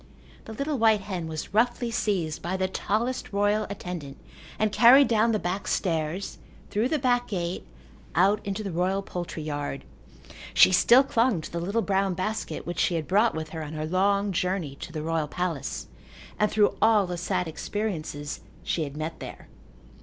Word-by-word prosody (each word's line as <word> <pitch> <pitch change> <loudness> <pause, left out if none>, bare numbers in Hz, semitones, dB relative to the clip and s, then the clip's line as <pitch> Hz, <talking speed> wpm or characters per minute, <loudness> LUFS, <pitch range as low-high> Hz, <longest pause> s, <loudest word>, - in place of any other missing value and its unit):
The 220 - -8
little 280 +3 -2
white 220 -2 +4
hen 185 -4 -4
was 160 +3 -6
roughly 240 +2 +1
seized 190 -9 -1
by 180 +2 -2
the 185 0 0
tallest 225 +6 -2
royal 205 +1 +1
attendant 175 -8 -6 0.4
and 215 -1 +1
carried 255 +6 +7
down 225 0 +3
the 215 - +2
back 195 0 -3
stairs, 165 +1 -1 0.3
through 220 +5 +1
the 310 - +1
back 245 -2 +1
gate, 180 -3 -3 0.5
out 200 +5 +3
into 200 +1 -3
the 195 - -4
royal 185 +3 0
poultry 175 -4 -5
yard. 145 -2 -4 0.7
She - - +8
still 235 +8 +6
clung 235 -6 +2
to - - -9
the 170 - -3
little 200 +7 -1
brown 195 -2 +1
basket 215 +5 -3
which 175 - -4
she 175 - +2
had 160 -2 -2
brought 210 +3 +3
with 155 0 -4
her 160 0 -6
on 155 0 -6
her 155 0 -3
long 200 +4 +1
journey 180 -4 -1
to - - -8
the 155 -2 -4
royal 160 -1 -1
palace 170 -3 -3 0.5
and 210 - +3
through 210 -1 +3
all 220 -3 +5
the 180 0 -4
sad 180 0 -1
experiences 160 -5 -4 0.2
she 160 - -1
had 140 +1 -8
met 155 +2 -4
there. - - -9
190 Hz, 180 wpm, -26 LUFS, 165-215 Hz, 0.7 s, She